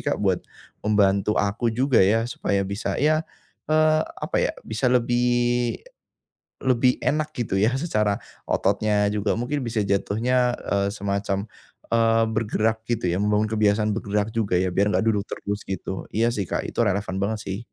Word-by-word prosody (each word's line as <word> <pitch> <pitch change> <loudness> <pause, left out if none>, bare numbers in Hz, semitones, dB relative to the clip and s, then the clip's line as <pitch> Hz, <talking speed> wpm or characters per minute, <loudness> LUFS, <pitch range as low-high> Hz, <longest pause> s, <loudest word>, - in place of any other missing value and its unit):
Kak - - 0
buat - - +1 0.4
membantu 105 0 +2
aku 105 +4 0
juga 125 +2 +2
ya 110 +4 +3
supaya 100 -5 -1
bisa, 100 +3 -3
ya, 155 +1 +3 0.5
eee, 155 0 +4 0.2
apa - - -2
ya, - - +1
bisa 110 +4 0
lebih 120 0 +2 0.9
lebih 125 -1 +3
enak 155 +1 0
gitu 105 -5 -1
ya, 110 +5 +2
secara 105 -9 0 0.3
ototnya 105 +1 +1
juga 105 0 0
mungkin 125 +6 -2
bisa 115 -4 -1
jatuhnya, 120 +5 +1 0.2
eee, 100 0 +2
semacam, 100 -1 -2 0.5
eee, 115 0 +3
bergerak 110 0 0
gitu 115 -7 0
ya, 90 - -1
membangun 105 +1 +1
kebiasaan 105 0 +2
bergerak 105 0 -1
juga 110 -5 0
ya, 90 +1 +1
biar 100 +3 +2
enggak 105 - +1
duduk 105 -3 0
terus 100 0 -5
gitu. 95 0 -5
Iya 115 +2 +2
sih 100 -5 -3
Kak, - - -2
itu - - -6
relevan 100 -3 0
banget 105 +2 -1
sih. 95 +1 -4
110 Hz, 160 wpm, -24 LUFS, 100-120 Hz, 0.9 s, eee